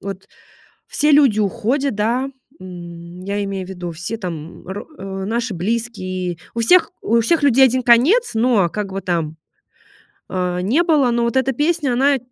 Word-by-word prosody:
вот 195 -1 -7 0.6
все 300 +1 +1
люди 275 -7 +5
уходят, 245 +6 0
да, 240 +6 0 0.3
м, 175 -1 -10
я 200 +1 -2
имею 195 -2 -4
в - - -10
виду, 175 -2 -6
все 175 +8 -5
там, 170 -5 -7
м, - - -21
ро 195 +2 -6
э, 195 0 -5
наши 230 0 -2
близкие. 185 -3 -3 0.2
У 230 - -2
всех 330 +8 +4
у 230 +2 +2
всех 310 +7 +1
людей 265 -1 +6
один 255 0 +2
конец, 265 - +4
но 220 -6 +3
как 200 +1 -5
бы 195 - -3
там, 165 -4 -2 0.9
э, 180 -1 -2
не 260 - +2
было, 290 -7 +3
но 235 0 +1
вот 235 +2 0
эта 265 +1 +2
песня, 295 -1 0
она 275 +2 +3
220 Hz, 175 wpm, -19 LUFS, 185-260 Hz, 0.9 s, людей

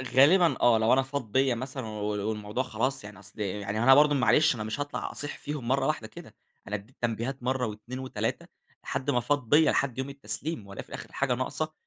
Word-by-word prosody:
غالبًا 165 +6 +6
آه، 120 -2 +6
لو 110 +2 +3
أنا 135 - +4
فاض 130 -5 -5
بيّا 130 -1 +3
مثلًا 130 0 -5
و 105 -1 -5 0.3
والموضوع 105 +3 -2
خلاص 125 +1 -2
يعني 105 0 -10
أصل 105 +2 -14
يعني 100 +1 -2
هو - - +1
أنا 135 +2 +8
برضه 145 0 +5
معلش 130 +2 +4
أنا 110 - -4
مش 110 +5 -4
هاطلَع 145 0 -3
أصيح 145 - -5
فيهم 145 -5 -5
مرة 135 +3 +2
واحدة 155 -8 -1
كده، - - -12 0.3
أنا 105 - -2
أدّيت 105 +6 -9
تنبيهات 120 +3 -2
مرة 130 0 0
و2 125 +5 -7
3 - - -2 0.4
لحد 130 +2 -2
ما 120 - +2
فاض 125 -1 -1
بيّا، 155 +1 +6
لحد 130 -3 0
يوم 130 +1 -3
التسليم 135 -1 -5
وألاقي 100 - -7
في - - -22
الآخِر - - -8
الحاجة 135 -2 0
ناقصة، 155 +5 -3
130 Hz, 220 wpm, -28 LUFS, 110-140 Hz, 0.4 s, أنا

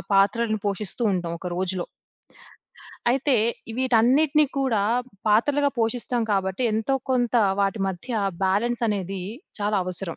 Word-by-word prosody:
పాత్రలను 215 +2 +2
పోషిస్తూ 200 +3 -2
ఉంటాం 175 -2 -2
ఒక 180 - -4
రోజులో. 185 -1 -2 1.2
అయితే 270 +2 +2 0.4
వీటన్నిటిని 260 +5 +4
కూడా 250 -7 +1 0.5
పాత్రలుగా 285 +7 +3
పోషిస్తాం 240 +1 0
కాబట్టి, 190 +4 -1
ఎంతో 225 +5 0 0.2
కొంత 245 -2 +1 0.3
వాటి 200 +1 0
మధ్య 190 +7 -7 0.4
బ్యాలెన్స్ 235 +6 0
అనేది 195 -2 -3 0.4
చాలా 205 0 +1
అవసరం. 180 -1 -4
215 Hz, 110 wpm, -24 LUFS, 190-250 Hz, 1.2 s, వీటన్నిటిని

